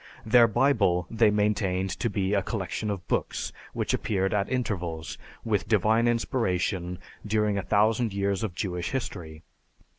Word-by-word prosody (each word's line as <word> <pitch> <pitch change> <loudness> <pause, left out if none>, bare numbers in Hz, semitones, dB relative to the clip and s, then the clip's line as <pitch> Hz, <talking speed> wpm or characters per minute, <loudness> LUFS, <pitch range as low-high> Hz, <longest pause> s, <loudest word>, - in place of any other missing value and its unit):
Their 115 +1 +6
Bible 110 -8 +2
they 115 -1 +4
maintained 105 -3 0
to 120 - 0
be 100 -1 -1
a 100 - +3
collection 100 +1 -3
of 100 -3 -4
books - - -2 0.2
which - - -1
appeared 95 -1 0
at 100 -1 0
intervals, 90 -10 -2 0.3
with - - 0
divine 110 +2 +3
inspiration, 95 -7 0 0.3
during 105 -1 +1
a 100 - 0
thousand 110 +4 +2
years 100 -1 -1
of 100 -6 -3
Jewish 90 -3 -3
history. 85 - -5
100 Hz, 145 wpm, -27 LUFS, 90-110 Hz, 0.3 s, Their